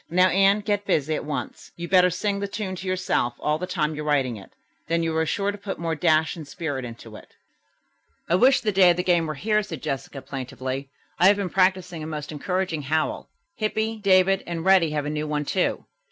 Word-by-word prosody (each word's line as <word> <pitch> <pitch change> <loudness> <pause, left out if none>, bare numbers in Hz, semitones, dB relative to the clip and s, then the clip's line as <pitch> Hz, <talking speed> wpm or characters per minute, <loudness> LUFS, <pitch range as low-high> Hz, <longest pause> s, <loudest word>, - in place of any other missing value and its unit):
"Now, 185 +2 +4
Anne, 195 +2 +4
get 205 -1 -1
busy 155 +1 +1
at - - -3
once. 150 - -5
You'd 170 0 -7
better 180 -1 +6
sing 200 +3 -1
the 200 - -2
tune 200 -2 -4
to 190 - -7
yourself 185 -10 0
all 150 +1 0
the 180 - -4
time 150 -2 -1
you're 150 0 -5
writing 140 -5 +1
it, 100 - -12 0.4
then 165 0 +1
you'll 160 -1 0
be 160 - -1
sure 200 +6 0
to 205 - -9
put 200 -1 -5
more 165 -1 -2
dash 160 -1 +2
and 160 -4 -9
spirit 145 -3 -4
into 115 -2 -10
it." - - -14 0.9
"I - - 0
wish 250 +9 +5
the 215 - 0
day 190 -2 +6
of 175 - +3
the 180 - 0
game 175 -3 +2
were 155 - -4
here," 215 +8 +1
said 165 -9 -8
Jessica 135 -2 -4
plaintively. 130 0 -5 0.3
"I 180 - +6
have 205 - +6
been 195 -4 -3
practising 185 -3 +1
a 155 - -5
most 150 -1 -5
encouraging 180 +1 -2
howl. 155 +3 -1 0.3
Hippy, 220 +1 -1
David 195 -1 +4
and 170 -1 -4
Reddy 190 -4 +5
have 150 -1 -2
a - - -2
new 155 0 -3
one, 150 -1 -2
too. 185 +5 -1
170 Hz, 225 wpm, -24 LUFS, 150-190 Hz, 0.9 s, better